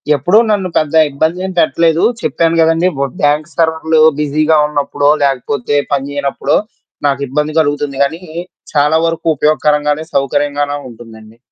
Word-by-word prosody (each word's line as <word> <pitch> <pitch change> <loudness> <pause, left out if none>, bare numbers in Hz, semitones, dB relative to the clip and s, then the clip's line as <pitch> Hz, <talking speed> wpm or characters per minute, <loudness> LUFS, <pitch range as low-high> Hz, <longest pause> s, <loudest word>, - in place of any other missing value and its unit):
ఎప్పుడూ 175 +10 +2
నన్ను 195 -3 0
పెద్ద 155 -1 -1 0.2
ఇబ్బదేం 170 +7 -2
పెట్టలేదు. 165 0 +2 0.2
చెప్పాను 165 0 0
గదండీ! 165 +3 +2
బు 140 - 0 0.2
బ్యాంక్ 150 +2 +1
సర్వర్లు 160 -1 +1 0.2
బిజీగా 155 +2 +1
ఉన్నప్పుడో, 145 -1 0
లేకపోతే 140 0 -1 0.2
పని 140 0 -1
జేయనప్పుడో, 140 0 -1 0.5
నాకు 140 0 -1
ఇబ్బంది 150 +3 -2
కలుగుతుంది 145 -2 -1
గానీ, 160 +5 -3 0.5
చాలా 150 +2 +3
వరకు 165 0 -4
ఉపయోగకరంగానే, 150 +1 +1
సౌకర్యంగానే 145 +1 -1
ఉంటుందండి. 110 -1 -14
150 Hz, 125 wpm, -14 LUFS, 140-160 Hz, 0.5 s, చాలా